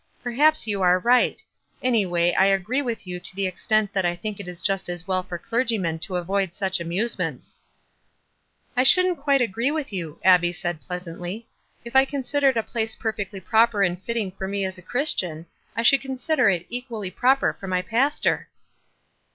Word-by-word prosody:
Perhaps 295 +6 +3
you 205 -3 -2
are 180 0 +5
right. 245 +5 +2 0.4
Any 230 -6 +2
way 175 0 +1
I 190 - +4
agree 195 +8 +1
witn 235 -6 -4
you 180 -1 -5
to 175 +1 -1
the 195 0 0
extent 210 +3 0
that 190 -2 +1
I 175 0 0
think 205 +3 -5
it 200 - -8
is 180 -1 -6
just 195 0 0
as 175 0 -4
well 185 -1 +1
for 180 -1 -6
clergymen 215 -6 -1
to 175 +3 -3
avoid 190 +1 -1
such 190 -2 0
amusement 180 +8 -1
J - - -12 0.7
" - - -39
"I - - +5
shouldn't 360 +6 +5
quite 280 -2 +2
agree 230 +3 0
with 300 -7 -3
you," 170 -4 -5
Abbie 175 -2 +5
said, 175 -3 -4
pleasantly. 180 +4 -6 0.4
"If 235 +2 -9
I 265 0 +7
considered 275 -1 0
a 225 - +1
place 220 -1 -3
per 220 -2 -2
fectly 195 -3 -7
proper 220 -1 +3
and 180 -1 -1
fitting 225 -3 -3
for 190 0 -6
me 200 0 -2
as 190 0 -4
a - - -13
Christian, 185 - 0 0.3
t 230 - +1
should 275 +3 +5
consider 265 -1 +1
it 175 -3 -1
equally 235 -6 -5
proper 260 +7 +2
for 195 - -10
my 185 -1 0
pas 255 +8 +1
tor." - - 0
200 Hz, 195 wpm, -24 LUFS, 180-245 Hz, 0.7 s, I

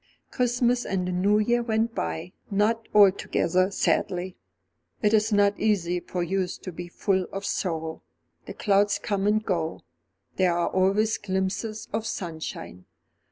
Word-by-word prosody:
Christmas 245 -1 +1
and 185 -2 -2
the - - -1
New 195 +4 +2
Year 235 +3 +2
went 225 0 0
by, 80 - -4 0.2
not 220 +3 +1
altogether 190 -2 +3
sadly. 185 -2 0 0.7
It 210 +1 +3
is 220 +1 +3
not 205 0 +3
easy 180 -5 +1
for 175 0 -3
youth 185 +1 -2
to 185 - -5
be 175 +1 -7
full 185 +1 0
of 195 +1 -5
sorrow. 160 -3 -2 0.5
The - - -7
clouds 200 0 +2
come 200 -1 -1
and 215 +1 +2
go, 165 -4 -2 0.6
there 180 -2 +2
are 175 - +1
always 200 +4 +2
glimpses 195 +3 -3
of 220 +1 -1
sunshine. 160 - -6
195 Hz, 145 wpm, -26 LUFS, 180-215 Hz, 0.7 s, altogether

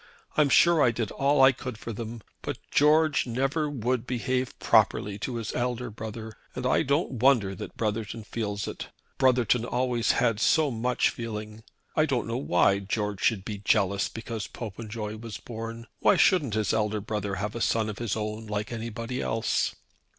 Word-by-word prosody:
I'm 150 -2 +4
sure 170 +2 +5
I 125 - +6
did 115 -2 -2
all 140 0 +3
I 135 - +8
could 130 -2 -7
for 115 +1 -6
them; 115 0 -6 0.2
but - - -4
George 155 -1 +4
never 135 +6 0
would 125 -2 -1
behave 125 0 -1
properly 100 0 +2
to 125 +4 -3
his 115 -2 -4
elder 125 -1 -2
brother, 110 0 -7 0.2
and 125 - -4
I 130 - +3
don't 140 -2 0
wonder 120 -6 +4
that 95 - -8
Brotherton 110 0 -2
feels 105 -2 -3
it. - - -6 0.3
Brotherton 125 -3 +3
always 120 -1 +1
had 115 -4 +1
so 150 +4 +3
much 125 +2 +1
feeling. 110 -1 -6 0.3
I 155 0 +3
don't 130 -4 0
know 115 +1 -2
why 100 -5 +3
George 105 0 -2
should 100 -5 +1
be 105 -2 -5
jealous 100 -1 +2
because 115 -2 -5
Popenjoy 110 -1 -6
was 110 -1 -7
born. 115 +1 -7
Why - - +5
shouldn't 145 - +3
his 110 0 +1
elder 105 -1 0
brother 105 -1 -3
have 105 +1 -3
a 115 - -5
son 110 -1 +1
of 105 -2 -5
his 115 -4 -1
own 110 0 -4
like 105 +1 -3
anybody 115 +2 -4
else?" 110 0 0
115 Hz, 175 wpm, -27 LUFS, 105-125 Hz, 0.3 s, I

